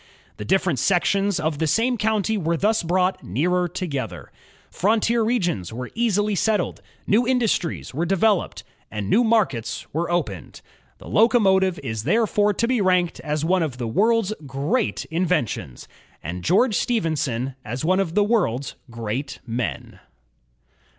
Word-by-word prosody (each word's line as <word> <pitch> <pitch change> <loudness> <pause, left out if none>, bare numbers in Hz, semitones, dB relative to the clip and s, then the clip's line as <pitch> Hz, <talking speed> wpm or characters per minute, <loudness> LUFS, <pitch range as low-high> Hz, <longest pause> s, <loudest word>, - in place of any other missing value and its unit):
The 105 - -6
different 180 - +1
sections 195 +4 +2
of 155 -1 -2
the 160 - +1
same 240 - +2
county 220 -1 0
were 170 -4 0
thus 215 +5 +2
brought 180 +2 0
nearer 175 - 0
together. 150 - -5 0.4
Frontier 225 +4 +1
regions 180 - -1
were 125 +3 -6
easily 210 -3 +1
settled, 205 0 0 0.2
new 230 +4 +2
industries 230 - 0
were 165 +6 -1
developed, 195 +1 +1 0.3
and 105 -2 -4
new 240 - +5
markets 185 - 0
opened. 165 - -2 0.4
The - - -13
locomotive 190 -5 +3
is 110 -1 -3
therefore 210 - +2
to 230 - +1
be 250 -3 +1
ranked 180 -3 +2
as 150 0 -2
one 185 +2 +2
of 145 -6 -2
the 120 -2 -3
world's 215 - +2
great 145 - -1
inventions, 160 - -1 0.4
and 90 +1 -5
George 215 +7 +3
Stephenson 155 - -1
as 125 +7 -4
one 185 +3 +3
of 170 -4 -1
the 210 - +4
world's 175 - 0 0.2
great 115 +4 -4
men. 120 0 -4
180 Hz, 140 wpm, -23 LUFS, 135-215 Hz, 0.4 s, new